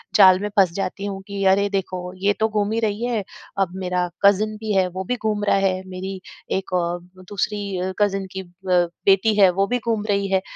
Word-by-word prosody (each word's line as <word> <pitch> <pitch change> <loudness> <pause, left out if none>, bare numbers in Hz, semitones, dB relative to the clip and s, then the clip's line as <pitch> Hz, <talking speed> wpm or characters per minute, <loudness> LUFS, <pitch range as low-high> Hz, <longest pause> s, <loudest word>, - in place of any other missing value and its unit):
जाल 185 -1 +7
में 205 +1 -3
फँस 185 -3 +5
जाती 195 +1 -3
हूँ 195 -1 -4
कि 200 -1 -4
अरे! 200 +1 +4
देखो, 185 -2 -3
ये 200 +2 +1
तो 220 0 +2
घूम 210 -1 0
ही 225 - 0
रही 220 +1 -1
है, 235 -4 -1 0.4
अब 185 -2 0
मेरा 180 -1 -1 0.2
कज़िन 200 +1 +5
भी 215 0 -4
है, 190 -2 +3
वो 185 +1 -5
भी 250 +7 -1
घूम 215 -3 -2
रहा 205 - +3
है। 190 -1 +1
मेरी 190 +1 -5 0.3
एक 190 -1 -2
औ 175 -1 0 0.3
दूसरी 205 -1 -2
अ, 185 +1 -2
कज़िन 195 -2 +1
की 190 - -5
अ, - - -12 0.2
बेटी 185 +4 +3
है, 195 -2 +8
वो 195 +2 +1
भी 245 +2 0
घूम 225 -3 -1
रही 200 -1 +1
है। 190 -1 +3
195 Hz, 220 wpm, -22 LUFS, 185-205 Hz, 0.4 s, है